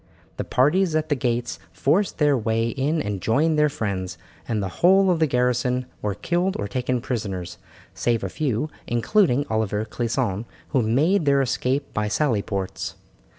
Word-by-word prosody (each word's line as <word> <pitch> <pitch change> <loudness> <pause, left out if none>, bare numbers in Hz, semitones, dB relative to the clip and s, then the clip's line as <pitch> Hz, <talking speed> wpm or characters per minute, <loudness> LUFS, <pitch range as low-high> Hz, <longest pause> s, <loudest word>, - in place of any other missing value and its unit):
The - - -2
parties 160 +6 +2
at 155 0 0
the 145 - +2
gates 120 -6 -2
forced 180 - +1
their 150 -2 +4
way 115 -1 0
in 145 +6 0
and 100 -2 -3
joined 150 +7 +2
their 150 0 +4
friends, 95 -9 -3 0.3
and 115 - -1
the - - -1
whole 190 +2 +6
of 170 - +1
the 160 - +3
garrison 125 0 +1 0.2
were 105 -2 -2
killed 175 - 0
or 100 - -3
taken 125 +3 -1
prisoners, 95 -8 -4 0.3
save 115 -3 0
a 95 - -2
few, 145 +4 -1 0.2
including 140 - +2
Oliver 110 -1 -1
Clisson, 115 -2 -2 0.2
who 135 - +2
made 150 - +2
their 140 -1 +4
escape 130 +2 -1
by 105 0 0
sally 110 -1 +1
ports. 95 -2 -4
125 Hz, 165 wpm, -23 LUFS, 110-150 Hz, 0.3 s, whole